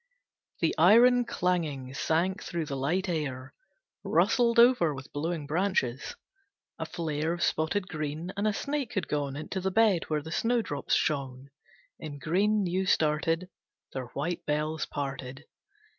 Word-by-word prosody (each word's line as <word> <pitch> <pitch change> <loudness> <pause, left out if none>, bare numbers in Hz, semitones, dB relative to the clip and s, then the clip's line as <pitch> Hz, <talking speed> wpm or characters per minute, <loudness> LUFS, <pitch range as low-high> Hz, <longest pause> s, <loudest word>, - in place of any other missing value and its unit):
The 165 - +2
iron 240 +8 +6
clanging 155 - -1
sank 170 +6 0
through 170 -2 -3
the 145 -2 -4
light 165 +9 0
air, 140 -6 -3 0.5
Rustled 235 -1 +3
over 235 - +5
with 135 0 -10
blowing 160 +1 -2
branches. 150 -5 -1 0.6
A - - -3
flare 160 -1 -2
Of 175 - -3
spotted 180 +5 0
green, 155 +1 -4
and 200 +2 0
a - - +3
snake 280 +3 -3
had 185 -6 -1
gone 145 -2 -2
Into 155 +6 -4
the 190 - 0
bed 205 -3 +3
where 150 -2 0
the 160 - -8
snowdrops 225 -8 0
shone 135 -2 -2 0.5
In 145 -2 -7
green 200 +8 +1
new 185 +1 -1
started, 165 +4 +1 0.4
Their 130 -2 -4
white 165 +5 -2
bells 150 +1 -1
parted. 135 0 -5
160 Hz, 145 wpm, -29 LUFS, 145-190 Hz, 0.6 s, iron